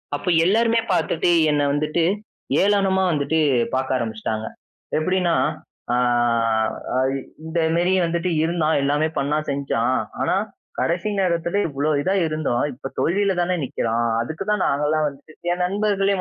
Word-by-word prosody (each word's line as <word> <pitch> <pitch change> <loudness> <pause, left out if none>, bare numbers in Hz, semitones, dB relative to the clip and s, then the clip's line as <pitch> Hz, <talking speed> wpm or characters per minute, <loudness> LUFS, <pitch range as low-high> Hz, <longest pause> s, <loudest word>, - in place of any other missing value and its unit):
அப்ப 145 - -7 0.2
எல்லாருமே 230 +4 +3
பார்த்துட்டு 175 -1 +1 0.2
என்ன 150 -1 +2
வந்துட்டு, 150 +3 0 0.6
ஏளனமா 195 -1 +2
வந்துட்டு 150 +1 0 0.4
பார்க்க 130 0 0
ஆரம்பிச்சுட்டாங்க. 110 -2 -3 0.5
எப்படின்னா, 180 +1 +1 0.6
ஆ - - +3 1.0
ஐ 130 - +3 0.4
இந்தமேரி 165 +2 +1
வந்துட்டு 170 +2 -1
இருந்தான், 160 -1 +1
எல்லாமே 145 +3 +2
பண்ணான், 150 +2 -1
செஞ்சான். 130 -3 0 0.3
ஆனா - - +1 0.4
கடைசி 175 +5 0
நேரத்தில 170 0 0
இவ்ளோ 145 +1 -1
இதா 190 +6 0
இருந்தும், 155 -6 -1
இப்போ 135 +2 -7
தோல்வியில 195 +3 +2
தானே 180 +1 +1
நிக்கிறான். 120 -2 -1 0.2
அதுக்கு 160 +10 -4
தான் 210 -2 +1
நாங்கலாம் 150 +2 +1
வந்து 140 +2 -10 0.2
என் 175 +1 -1
நண்பர்களே. 200 +1 +1
160 Hz, 125 wpm, -22 LUFS, 140-185 Hz, 1.0 s, எல்லாருமே